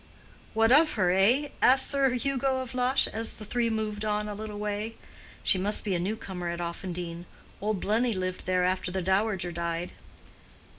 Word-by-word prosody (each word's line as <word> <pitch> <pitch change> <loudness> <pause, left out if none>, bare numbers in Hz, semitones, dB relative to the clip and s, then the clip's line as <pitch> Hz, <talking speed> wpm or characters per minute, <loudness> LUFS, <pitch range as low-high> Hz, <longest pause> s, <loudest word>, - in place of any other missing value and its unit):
"What 225 +1 +4
of 305 +3 +6
her, 185 -5 +2
eh?" 235 +11 +3
asked 260 +1 +6
Sir 275 -2 +3
Hugo 265 0 0
of 255 -1 -6
Lush, 255 +2 +3
as 225 0 -3
the 215 - -9
three 235 +2 0
moved 215 -1 -2
on 210 0 -1
a 210 - -4
little 210 0 -6
way. 210 +2 -3 0.5
"She 190 - +3
must 205 +3 +1
be 200 - -1
a 175 - 0
new 195 +5 -1
comer 180 -5 -5
at 170 0 -4
Offendene. 175 0 -5 0.4
Old 210 -1 -1
Blenny 230 +5 +1
lived 185 0 -4
there 185 -1 +2
after 185 0 0
the 185 0 -2
dowager 190 -1 +1
died." 170 +1 -3
210 Hz, 185 wpm, -28 LUFS, 185-230 Hz, 0.5 s, of